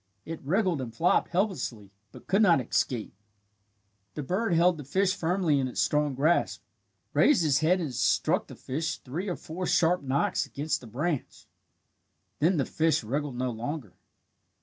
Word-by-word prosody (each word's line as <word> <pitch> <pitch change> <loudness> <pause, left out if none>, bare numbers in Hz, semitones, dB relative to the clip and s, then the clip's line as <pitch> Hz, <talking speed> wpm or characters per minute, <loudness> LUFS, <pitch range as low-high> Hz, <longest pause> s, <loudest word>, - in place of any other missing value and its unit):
It 165 0 -6
wriggled 180 0 0
and 120 -3 -5
flopped 165 +10 +2
helplessly, 170 - -2 0.2
but - - -14
could 195 +3 +2
not 175 -8 +5
escape. 120 -2 -1 1.0
The 150 - -4
bird 190 +9 -1
held 170 0 +3
the - - -6
fish 190 +8 +1
firmly 170 -4 +1
in 130 - 0
its 125 - -5
strong 150 -2 +1
grasp, 155 +6 +1 0.5
raised 285 - +4
his 145 -3 +3
head 175 +4 +3
and 155 -7 -3
struck - - +1
the - - -10
fish 155 +5 -3
three 170 +10 -5
or 175 - -2
four 180 +3 -5
sharp 175 0 +3
knocks 135 0 0
against 150 +3 -3
the 125 - -11
branch. 145 +6 -3 0.9
Then 170 +4 +3
the 140 - +1
fish 160 -3 +1
wriggled 140 +4 -3
no 125 0 -1
longer. 120 - -5
155 Hz, 165 wpm, -28 LUFS, 135-180 Hz, 1.0 s, not